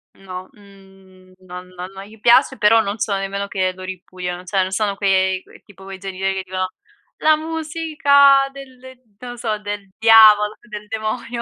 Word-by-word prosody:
No, 185 -1 -9
mhmm, 195 -2 -20 0.2
non 180 0 -9
non 180 +1 -9
non 195 0 -9
gli 215 +2 -16
piace, 260 +4 +4
però 225 +1 +4
non 200 0 -4
sono 200 -2 -1
nemmeno 200 +1 -4
che 185 -2 -1
lo 185 - -11
ripudiano, 180 -1 -7
cioè 190 +1 0
non 185 0 -2
sono 200 0 -1
quei 190 -1 +1
quei - - -19
tipo 195 -1 -17
quei 195 -1 -9
genitori 195 0 -3
che 190 0 -4
dicono: 185 0 -3 0.5
"La 310 0 +3
musica 305 -4 +2
del" 270 -2 -12 0.4
non 245 0 -8
lo 245 - -10
so, 220 -3 -2
"del 205 -1 -6
diavolo, 215 -2 +6
del 210 -1 -9
demonio". 225 +2 -4
200 Hz, 180 wpm, -19 LUFS, 190-225 Hz, 0.5 s, diavolo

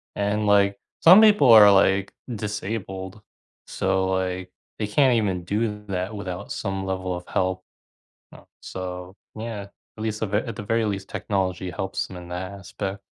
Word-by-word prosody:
And, 105 +1 0
like, 100 -1 +4 0.2
some 185 +6 +8
people 205 - +6
are, 105 -2 +9
like, 95 0 +3 0.2
disabled, 105 -2 -5 0.5
so, 95 0 0
like, 95 0 -2 0.3
they 105 - -1
can't 130 +4 +3
even 95 -6 -1
do 105 +1 -2
that 95 +2 -3
without 95 -2 -6
some 95 0 -3
level 95 -1 -3
of 90 0 -8
help. 95 0 -1 0.7
Uh, - - -15 0.2
so 90 0 -7 0.2
yeah, 110 -2 -5 0.4
at - - -5
least 110 -1 -3
the 110 - 0
ver 105 +1 0
at 115 +1 -5
the 105 - -5
very 115 +2 0
least, 100 -1 -3
technology 95 -2 -2
helps 95 +1 -3
them 95 - -10
in 90 -1 -10
that 90 +2 -5
aspect. 100 0 -6
100 Hz, 165 wpm, -24 LUFS, 95-105 Hz, 0.7 s, are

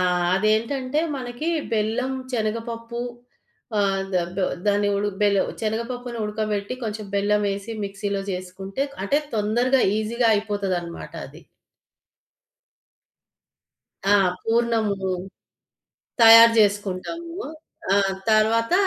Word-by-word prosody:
ఆ! - - +2 0.3
అదేంటంటే 235 +7 +1 0.2
మనకి 250 +5 -4 0.2
బెల్లం, 225 +5 0 0.2
చనగపప్పు 230 +1 -3 0.8
ఆహ్, 195 -1 +1
ద - - +2 0.2
బొ 190 - +1 0.2
దాన్ని 205 0 +2
ఉడ 205 +1 0 0.2
బెలు 200 -2 +4 0.2
శనగపప్పుని 235 +2 -3
ఉడకబెట్టి 210 +1 -2
కొంచెం 215 -1 -4
బెల్లవేసి, 200 +1 0
మిక్సీ‌లో 200 0 -3
జేసుకుంటే 190 +5 -4 0.2
అంటే 280 +9 +2 0.2
తొందరగా 240 +5 +2 0.2
ఈజీగా 230 +2 0
అయిపోతదన్నమాట 195 -5 -3
అది. - - -14 2.7
ఆ! 205 +1 +6 0.3
పూర్ణము. 225 -2 +1 1.3
తయారు 230 0 +10
జేసుకుంటాము. 205 - 0 0.6
ఆ! - - +4 0.3
తర్వాత 225 +3 +3
215 Hz, 90 wpm, -23 LUFS, 200-235 Hz, 2.7 s, తయారు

